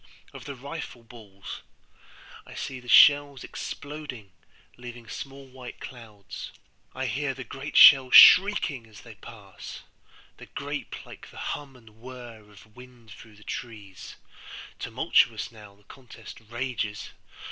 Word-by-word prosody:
of - - -11
the 140 -1 -7
rifle 135 -2 -8
balls;I 105 -5 -15
see 130 -1 -6
the 125 - -17
shells 145 0 +6
exploding, 145 -8 -8 0.4
leaving 120 -1 -11
small 135 +3 -9
white 130 -2 -12
clouds—I 115 +2 -10
hear 135 +3 -2
the 130 - -7
great 135 +3 -6
shells 135 -3 +8
shrieking 180 - +7
as 105 -2 -15
they 115 - -13
pass; 100 -2 -12 0.5
The - - -13
grape, - - -7
like - - -13
the - - -16 0.2
hum 140 -2 -9
and 110 -3 -19
whirr 120 -2 -10
of 105 +1 -19
wind 125 -3 -16
through 105 +1 -14
the 105 - -18
trees, 105 -6 -9 0.5
(quick, - - -28
tumultuous, - - +1
now 105 -3 -15
the 100 - -27
contest 115 0 -13
rages!) 120 -4 -4
120 Hz, 130 wpm, -26 LUFS, 110-135 Hz, 0.5 s, shells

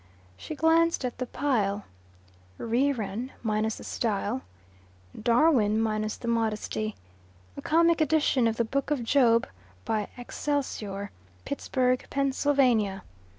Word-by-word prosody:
She 310 - -7
glanced 325 -1 +3
at 245 -1 -4
the 255 - -2
pile. 210 -8 0 0.7
Reran, 235 -2 -1
minus 215 0 0
the - - -10
style. 220 +2 -2 0.8
Darwin, 235 -3 +3
minus 215 -1 -1
the 235 - -7
modesty. 220 -1 -1 0.6
A - - -7
comic 335 +1 +3
edition 295 -5 +3
of 225 0 -1
the 235 - +1
book 275 +5 -2
of 290 -5 0
Job, 230 -2 +3 0.4
by 210 -2 -1
"Excelsior," 240 -7 -3 0.3
Pittsburgh, 255 -2 0
Pa. 275 -1 +1
235 Hz, 110 wpm, -27 LUFS, 215-280 Hz, 0.8 s, glanced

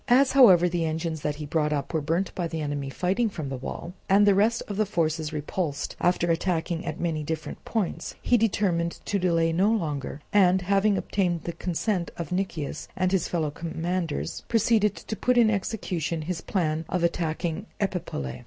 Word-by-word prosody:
As 265 +2 +5
however 190 -10 +7
the 175 -1 -1
engines 160 0 -2
that 150 0 -1
he 150 0 -6
brought 150 0 0
up 145 +1 -2
were 160 - +1
burnt 170 +6 -1
by 175 -2 -2
the 165 -1 -4
enemy 145 -2 -3
fighting 190 - 0
from 155 -8 -5
the 135 - -3
wall, 135 +6 -6 0.2
and 200 +2 +6
the 200 - +6
rest 220 +4 +2
of 205 - -4
the 215 - +3
forces 160 -4 0
repulsed 150 0 -3
after 175 -1 +2
attacking 165 0 -1
at - - -4
many 160 -3 -1
different 155 +1 -5
points, 215 -6 -2
he 245 - +2
determined 190 -7 +1
to 200 - 0
delay 165 -2 +2
no 190 +5 +3
longer, 150 - -2
and 185 -2 +5
having 200 +2 +3
obtained 180 -4 -1
the 170 - -4
consent 180 +1 -1
of 170 -1 -5
Nicias 175 -6 -3
and 185 0 +1
his 190 -2 +1
fellow 160 -4 -1
commanders, 165 0 -3
proceeded 220 -2 +3
to 220 - -6
put 250 +3 +1
in 225 -2 +6
execution 175 -6 -2
his 165 +1 -3
plan 160 -4 -1
of 180 -2 -1
attacking 170 +2 -1
Epipolae. 170 - -3
175 Hz, 185 wpm, -26 LUFS, 160-195 Hz, 0.2 s, however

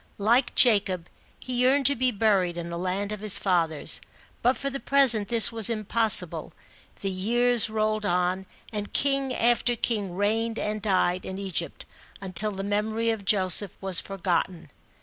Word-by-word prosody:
Like 230 +6 +1
Jacob, 195 -7 +1 0.3
he 250 -1 -4
yearned 270 +2 +2
to 280 +2 +5
be 255 +1 0
buried 195 -6 0
in 170 0 -6
the 170 - -5
land 190 +3 -3
of 210 - -6
his 210 -1 +3
fathers, 165 -5 0 0.4
but 250 +2 +1
for 275 0 -4
the 275 - -5
present 255 -8 +3
this 230 -3 +6
was 225 -2 +4
impossible. 220 0 0 0.5
The 195 - -3
years 235 +5 +2
rolled 215 0 -2
on, 180 0 -2 0.3
and 205 -1 -6
king 275 -1 0
after 240 0 +1
king 210 -6 -3
reigned 225 +3 -1
and 210 0 -4
died 185 -2 0
in 190 - -7
Egypt, 190 -3 -5 0.3
until 195 +2 +1
the 195 -1 -6
memory 215 +3 -2
of 215 -3 -6
Joseph 190 -1 +2
was 190 -2 +2
forgotten. 185 -2 -4
210 Hz, 160 wpm, -25 LUFS, 190-230 Hz, 0.5 s, this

